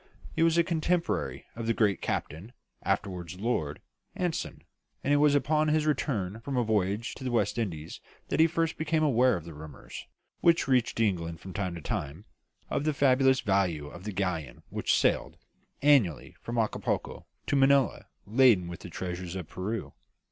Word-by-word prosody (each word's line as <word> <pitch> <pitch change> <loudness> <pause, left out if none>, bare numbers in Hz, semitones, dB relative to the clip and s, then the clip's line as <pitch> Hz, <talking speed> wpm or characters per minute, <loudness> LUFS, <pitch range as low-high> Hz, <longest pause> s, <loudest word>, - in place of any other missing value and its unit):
He - - 0
was 165 0 +4
a 170 - +5
contemporary 170 +1 -1
of 115 0 -5
the 115 - +2
great 100 -5 +2
Captain 90 +11 -4 0.3
(afterwards 90 -3 -2
Lord) 90 -10 -1 0.4
Anson; 175 -3 -3 0.4
and 140 - +2
it - - +5
was 145 0 +4
upon 155 +2 +2
his 155 0 +2
return 115 -9 -1
from 130 +3 -4
a 120 - +3
voyage 105 0 0
to 135 - -10
the 130 - -1
West 115 -2 +1
Indies 80 -8 -4 0.3
that - - 0
he 160 - +7
first 165 0 -1
became 155 0 +1
aware 130 -5 +4
of 85 - -8
the 85 - -8
rumours, 75 0 -10 0.3
which 170 -3 +3
reached 125 -4 +2
England 85 -7 0
from 95 +1 -9
time 95 -3 -2
to 85 - -7
time, 75 +7 -4 0.4
of - - -1
the 155 -1 0
fabulous 130 -1 +4
value 90 -7 0
of 85 +4 -11
the 105 - -4
galleon 90 -5 -3
which - - +1
sailed - - +1 0.5
annually 130 - +3
from 120 0 -4
Acapulco 110 -2 -2 0.2
to - - 0
Manilla 135 -1 +3 0.2
laden 110 -5 +4
with 85 - -7
the - - -9
treasure 90 0 -5
of 85 - -8
Peru. 105 +4 -4
115 Hz, 175 wpm, -29 LUFS, 90-140 Hz, 0.5 s, he